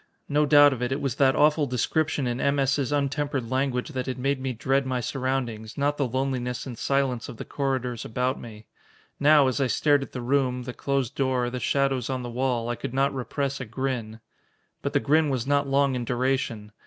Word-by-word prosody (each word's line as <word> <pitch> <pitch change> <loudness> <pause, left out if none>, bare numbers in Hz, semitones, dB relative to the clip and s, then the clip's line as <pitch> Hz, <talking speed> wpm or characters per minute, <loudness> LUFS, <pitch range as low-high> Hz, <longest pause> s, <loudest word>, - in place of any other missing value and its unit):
No 150 +1 +2
doubt 145 -1 +7
of 125 - -6
it, 125 +1 -1
it 135 - 0
was 135 -3 -2
that 135 -1 +4
awful 150 0 +3
description 140 +3 0
in 120 +1 -2
M. 140 0 +2
S.'s 140 0 +1
untempered 140 -3 -1
language 130 -1 0
that 130 0 -4
had 130 - -3
made 135 +1 -1
me 130 0 -2
dread 135 +3 +1
my 130 -1 -2
surroundings, 125 -4 -3
not 145 +1 +1
the 140 - +1
loneliness 125 -1 -2
and 130 -3 -6
silence 135 -1 0
of 115 - -9
the - - -7
corridors 130 -4 -2
about 125 +3 -1
me. 110 -2 -11 0.5
Now, 145 -1 +6
as 130 +2 0
I 135 - +2
stared 145 +2 +3
at 135 - -7
the 130 - -5
room, 125 0 0
the 125 0 -6
closed 135 -3 -1
door, 130 -3 0
the 125 - -3
shadows 135 -2 0
on 130 -1 -2
the 120 - -5
wall, 125 -1 -1
I 120 - -1
could 120 - -6
not 135 +1 +2
repress 135 +1 -3
a - - -4
grin. 115 -1 -3 0.6
But - - -3
the - - +4
grin 150 +5 +3
was 130 -3 -1
not 140 0 +1
long 140 0 +2
in 125 -1 -2
duration. 120 -3 -1
130 Hz, 215 wpm, -26 LUFS, 125-140 Hz, 0.6 s, doubt